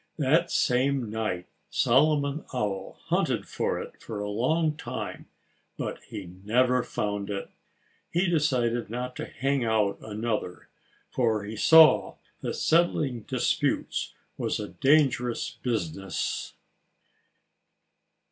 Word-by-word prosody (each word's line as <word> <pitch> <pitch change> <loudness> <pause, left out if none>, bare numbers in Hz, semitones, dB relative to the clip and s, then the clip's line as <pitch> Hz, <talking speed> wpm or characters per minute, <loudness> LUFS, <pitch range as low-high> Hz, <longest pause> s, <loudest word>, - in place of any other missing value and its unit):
That 160 +4 +3
same 125 -2 +1
night 110 -5 -2 0.2
Solomon 145 +3 +2
Owl 100 -6 -3
hunted - - +1
for - - -1
it - - -9
for 110 - -6
a 105 - -3
long 155 +8 +1
time. 160 - -6 0.5
But - - -4
he 100 - -7 0.2
never 125 +4 +3
found 105 -3 -3
it. 100 -1 -4 0.6
He 175 +3 +1
decided 125 -9 +1
not 125 +2 -4
to - - -4
hang 135 -1 -1
out 110 -3 +1
another, 110 -4 -4 0.4
for 110 -4 +1
he 105 +2 -6
saw 160 +7 +6 0.3
that - - -3
settling 155 -6 +2
disputes - - 0 0.2
was - - -1
a 105 - -5
dangerous 135 -4 +2
business. 95 -5 -2
120 Hz, 110 wpm, -27 LUFS, 105-140 Hz, 0.6 s, saw